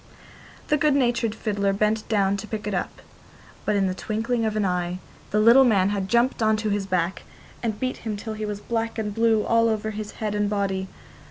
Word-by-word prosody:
The 300 - +4
good 295 -1 +3
natured 240 -4 +1
fiddler 200 -3 0
bent 215 +2 0
down 200 -3 +2
to 200 - -7
pick 215 -2 -5
it 210 - -2
up, 180 - -4 0.6
but 210 - +1
in 200 -1 +2
the 185 - 0
twinkling 225 +4 -2
of 215 -1 -1
an 210 -2 +1
eye 180 -1 -1 0.3
the 210 - +1
little 235 +5 +7
man 200 -6 +3
had 195 -2 -2
jumped 240 +1 +2
on 220 0 +3
to 215 0 -2
his 200 -1 -1
back, 180 -1 -1 0.4
and 220 -3 -2
beat 255 0 -2
him 215 -2 -4
till 220 +2 -5
he 215 0 -5
was 205 -1 -5
black 230 0 -2
and 210 -2 -2
blue 225 -1 +3
all 230 0 +3
over 220 0 -1
his 210 0 -6
head 215 -2 -3
and 205 0 0
body. 195 -2 -1
215 Hz, 220 wpm, -24 LUFS, 200-225 Hz, 0.6 s, little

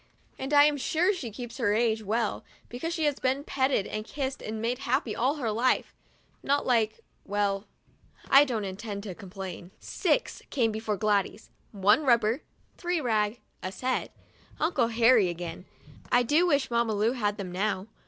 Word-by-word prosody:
And 265 +2 -4
I'm 290 0 +6
sure 325 +9 +2
she 290 - -5
keeps 240 +4 -8
her 210 -4 +2
age 225 -1 +1
well, 220 +1 -1 0.3
because 250 +8 -4
she 330 -2 -2
has 295 -2 +1
been 265 +2 0
petted 265 -8 +1
and 215 0 -4
kissed 270 +3 -4
and 220 0 -5
made 240 +3 -1
happy 260 -3 -1
all 260 +5 +1
her 245 -7 -2
life; 240 +4 +1 0.5
not 285 +1 +1
like 225 -3 +1
— - - -41
well, 200 0 -1 0.6
I 275 +1 +8
don't 235 -7 -2
intend 200 +1 -5
to 200 -4 -5
complain. 190 -2 -8
Six - - -1
came 235 -5 +1
before 215 -1 -2
Gladys 205 +1 0 0.2
— - - -37 0.2
one 215 +7 +7
rubber, 235 0 +3 0.4
three 350 -1 0
rag, 220 -3 0 0.2
a 185 - -4
set 255 +7 -2 0.3
— - - -27
Uncle 300 -7 +2
Harry 230 -3 +4
again! 175 +1 -6 0.5
I 245 - +5
do 310 +9 +3
wish 285 -6 +1
Mamma 235 -2 +1
Lu 215 +3 +2
had 210 -5 -1
them 190 -3 -5
now. 190 +1 -1
230 Hz, 175 wpm, -28 LUFS, 210-265 Hz, 0.6 s, I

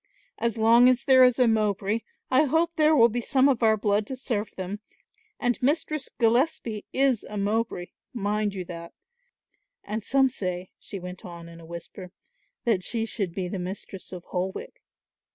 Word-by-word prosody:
As 230 -1 -1
long 230 +3 +6
as 250 -1 +2
there 260 -1 +6
is 250 -1 +5
a 250 -2 +4
Mowbray 210 -1 +1 0.3
I 265 +4 +5
hope 325 +4 +2
there 310 0 +4
will 235 -5 +7
be 240 +1 -2
some 265 +3 +3
of 260 -4 +1
our 220 -1 +4
blood 205 0 +1
to 265 - -4
serve 230 -5 -2
them 190 +2 -5 0.6
and 245 -1 0
Mistress 295 +1 0
Gillespie 230 -2 0
is 265 -4 +2
a 210 - -7
Mowbray, 205 -3 -1 0.2
mind 210 -3 -1
you 185 -2 -4
that, 170 -1 -8 0.9
and 215 +1 -4
some 270 +3 +3
say," 185 -7 -4
she 195 - -7
went 180 0 -8
on 170 -2 -9
in 170 0 -12
a 165 - -13
whisper, 170 +2 -9 0.5
"that 220 -6 +2
she 225 +3 0
should 200 -5 -2
be 185 +1 -3
the 185 +1 -4
Mistress 185 +1 -6
of 180 -2 -7
Holwick. 190 - -4
220 Hz, 175 wpm, -26 LUFS, 190-250 Hz, 0.9 s, will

